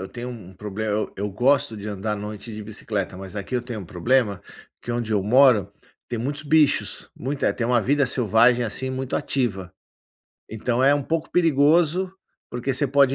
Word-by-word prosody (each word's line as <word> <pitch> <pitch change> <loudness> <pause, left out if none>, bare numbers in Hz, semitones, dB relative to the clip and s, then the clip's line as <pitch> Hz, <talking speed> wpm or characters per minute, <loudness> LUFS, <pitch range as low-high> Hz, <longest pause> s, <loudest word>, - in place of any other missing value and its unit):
eu 95 - -6
tenho 120 +1 -7
um 110 -7 -9
problema, 105 +3 -4
eu 105 +1 -1
eu 100 +1 -3
gosto 120 +3 +2
de 105 +1 -6
andar 105 +1 -3
à - - -2
noite 105 +2 -7
de 105 - -6
bicicleta, 105 -2 -4
mas 95 +1 -9
aqui 100 +5 -5
eu 120 - -2
tenho 120 -3 -6
um 95 - -9
problema, 100 +3 +1 0.4
que 120 - -4
onde 120 -2 -2
eu 100 -2 +2
moro 110 -3 +5 0.4
tem 120 - -3
muitos 140 +5 -2
bichos, 155 0 +2
muita 135 +3 -1
tem 115 - -2
uma 120 -1 +3
vida 140 +5 +2
selvagem, 120 0 +3
assim, 130 +4 -3
muito 130 0 -2
ativa. 100 -9 -2 0.8
Então 120 +3 -1
é 135 +2 +6
um 145 0 +1
pouco 165 +3 -2
perigoso, 165 +3 +3 0.4
porque 125 +2 -2
você 140 +1 0
pode 140 0 +4
120 Hz, 190 wpm, -23 LUFS, 105-135 Hz, 0.8 s, é